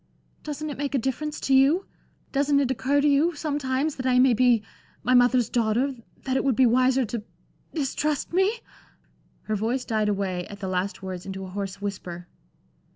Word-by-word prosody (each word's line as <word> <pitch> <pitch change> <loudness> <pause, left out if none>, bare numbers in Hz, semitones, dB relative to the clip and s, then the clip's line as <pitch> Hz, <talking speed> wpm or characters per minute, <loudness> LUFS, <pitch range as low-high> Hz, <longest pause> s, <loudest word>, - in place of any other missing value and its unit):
"Doesn't 300 0 -5
it 280 - -8
make 285 -1 -2
a - - +4
difference 275 +5 -2
to 270 - +1
you? 280 +8 +4 0.5
Doesn't 280 0 +2
it 265 -2 +1
occur 275 +3 +1
to 295 - +3
you 295 +4 +3
sometimes 290 -1 -1
that 260 -1 -2
I 250 -1 +3
may 255 0 +5
be 240 -2 +3 0.4
my 250 - +2
mother's 245 -1 +4
daughter; 240 +4 +1 0.3
that 260 -1 -1
it - - +1
would 270 -4 +2
be 260 - +5
wiser 255 +2 +3
to 230 0 -4 0.5
distrust 300 +1 -1
me?" 395 +6 +2 0.8
Her 215 - -2
voice 235 +5 -1
died 215 -2 0
away 190 -3 -2
at 205 - -10
the 195 - -4
last 185 +2 -2
words 185 -1 -6
into 190 0 -5
a - - -9
hoarse 195 0 -5
whisper. 180 -3 -5
255 Hz, 185 wpm, -25 LUFS, 210-280 Hz, 0.8 s, may